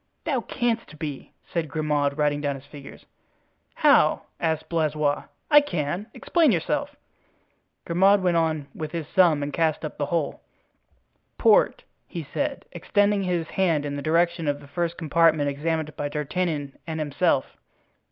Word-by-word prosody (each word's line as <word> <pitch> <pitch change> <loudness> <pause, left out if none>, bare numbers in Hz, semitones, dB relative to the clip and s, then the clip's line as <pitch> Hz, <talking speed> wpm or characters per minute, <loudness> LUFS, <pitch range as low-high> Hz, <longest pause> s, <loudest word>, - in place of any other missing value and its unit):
"Thou 275 -6 0
canst 230 -8 -2
be," 145 -3 -6 0.2
said 165 -3 -1
Grimaud, 145 -1 0
writing 145 -1 +1
down 145 -1 -1
his 135 0 -11
figures. 145 -1 -12 0.7
"How?" - - +4 0.2
asked 160 -2 -1
Blaisois, 155 -3 0 0.3
"I 295 0 +9
can? 175 - -3
Explain 330 -6 +3
yourself." 290 - -1 0.9
Grimaud 195 +4 +4
went 180 -2 +2
on 160 -3 +1
with 155 0 -6
his 165 -4 -4
sum 165 -6 +4
and 145 0 -4
cast 160 -1 0
up 150 - -7
the 145 - 0
whole. 165 -4 -2 1.0
"Port," - - +4 0.2
he 170 - -6
said, 285 -1 -2
extending 205 +3 +1
his 175 -3 -1
hand 165 -6 +1
in 145 0 -3
the 145 - -4
direction 170 +1 +1
of 145 0 0
the 140 - -14
first 170 +3 -2
compartment 160 -2 +3
examined 155 +1 -2
by 145 - -3
D'Artagnan 150 -1 -3
and 160 -1 -3
himself. 150 -2 0
160 Hz, 150 wpm, -25 LUFS, 145-180 Hz, 1.0 s, I